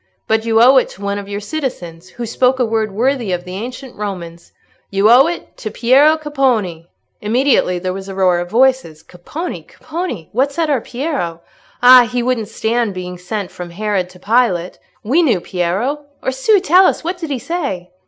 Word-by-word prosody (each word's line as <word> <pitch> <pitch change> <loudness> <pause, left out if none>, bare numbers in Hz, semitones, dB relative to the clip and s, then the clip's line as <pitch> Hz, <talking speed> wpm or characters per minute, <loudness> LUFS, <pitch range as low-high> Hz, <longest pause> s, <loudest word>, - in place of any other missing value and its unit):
But 220 0 +1
you 225 0 +3
owe 255 +3 +7
it 260 - +3
to 195 - -14
one 200 0 -2
of 200 0 -9
your 205 0 -3
citizens, 200 - -5
who 240 - -6
spoke 250 +3 +1
a 250 - +3
word 220 -1 -1
worthy 240 0 0
of 175 0 -3
the 180 - -8
ancient 245 +5 -7
Romans—you 195 +1 -4
owe 260 +5 +7
it 345 - -6
to 215 - -5
Piero 270 +8 +4
Capponi!" 250 - -1 0.3
Immediately 230 -4 +2
there 185 +1 -3
was 195 +1 -7
a 195 - -7
roar 185 -2 +2
of 175 0 -5
voices. 250 -9 +1
"Capponi! 295 - -7
Capponi! 310 - -6
What 265 +5 +1
said 315 +1 -1
our 265 -5 +1
Piero?" 245 - -4 0.4
"Ah! 250 -1 +8
he 245 -1 -1
wouldn't 240 -4 -1
stand 225 -1 -1
being 180 -1 -6
sent 190 +2 -5
from 180 -1 -8
Herod 195 0 -2
to 180 0 -16
Pilate!" 195 -5 0 0.2
"We 275 +11 +2
knew 245 - +2
Piero!" 190 +13 -2 0.2
"Orsù! 360 +10 +2
Tell 370 +2 +6
us, - - -1
what 350 +2 -3
did 325 -3 -5
he 275 - -1
say?" 250 - -4
225 Hz, 185 wpm, -17 LUFS, 185-265 Hz, 0.4 s, Ah